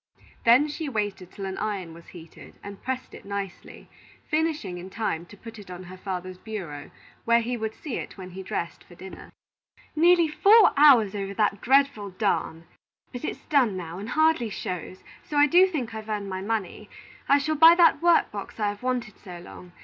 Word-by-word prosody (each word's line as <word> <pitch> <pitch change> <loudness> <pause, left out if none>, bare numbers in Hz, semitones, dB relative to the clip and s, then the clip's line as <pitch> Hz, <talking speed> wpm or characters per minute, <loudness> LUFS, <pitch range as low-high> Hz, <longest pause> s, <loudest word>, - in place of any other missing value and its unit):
Then 245 +6 +6
she 300 0 -5
waited 205 -6 -3
till 195 - -7
an 190 0 -5
iron 195 -6 -4
was 170 0 -15
heated, 165 -2 -13
and 200 -1 -9
pressed 260 0 -5
it - - -11
nicely, 200 -2 -7 0.4
finishing 305 - -1
in 185 +2 -9
time 175 -6 -3
to 205 - -15
put 225 +1 -11
it 200 - -13
on 180 0 -8
her 185 +1 -11
father's 185 -1 -6
bureau, 185 -9 -7 0.3
where 235 0 +3
he 245 +2 -3
would 220 -1 -4
see 290 -6 -5
it - - -8
when 185 -1 -9
he 190 +2 -8
dressed 190 -3 -5
for 175 - -17
dinner. 190 +2 -11 0.6
"Nearly 340 +1 +5
four 405 +7 +6
hours 265 -9 +6
over 200 -1 -5
that 205 -2 0
dreadful 270 -6 +2
darn! 180 -4 -2 0.5
But 245 - -8
it's - - -5
done 250 -10 +2
now, 175 0 -7
and 210 +3 -7
hardly 315 -7 +2
shows, 185 -2 -6 0.2
so 295 - -5
I 290 - +7
do 355 +5 +5
think 265 -11 -4
I've 220 0 -8
earned 205 -2 -3
my 185 0 -4
money. 210 -2 -4 0.4
I 280 - +6
shall 305 +2 -1
buy 325 +2 +8
that 340 -3 +4
work 345 0 +3
box 205 +2 -8
I 210 -1 +1
have 205 0 -7
wanted 245 -4 -3
so 180 -3 -10
long. 180 0 -12
215 Hz, 195 wpm, -25 LUFS, 185-280 Hz, 0.6 s, buy